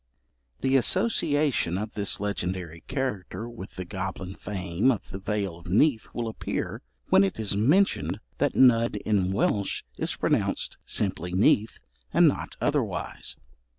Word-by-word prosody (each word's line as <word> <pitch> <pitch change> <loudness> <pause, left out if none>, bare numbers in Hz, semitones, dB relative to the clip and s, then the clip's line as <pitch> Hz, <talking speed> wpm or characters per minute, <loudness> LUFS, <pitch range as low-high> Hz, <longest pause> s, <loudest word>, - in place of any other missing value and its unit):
The 135 +1 +4
association 145 - +2
of 105 +2 -4
this 100 -1 0
legendary 90 -4 -3
character 110 -5 -3
with 115 -5 -9
the 90 -1 -5
goblin 95 0 -5
fame 95 +3 -1
of 120 -6 -1
the 95 - -5
Vale 100 -3 -2
of 85 - -13
Neath 110 - +3
will 120 -1 -3
appear, 110 - -4 0.3
when 95 - +6
it 100 +3 -1
is 105 -3 0
mentioned 110 - +2 0.2
that 145 0 +1
Nudd 115 -3 +5
in 95 -3 +1
Welsh 100 0 0
is - - 0
pronounced - - 0
simply 90 -3 -2
Neath, 105 +3 +3 0.3
and - - +6
not - - -1
otherwise. - - -2
100 Hz, 140 wpm, -27 LUFS, 95-120 Hz, 0.3 s, when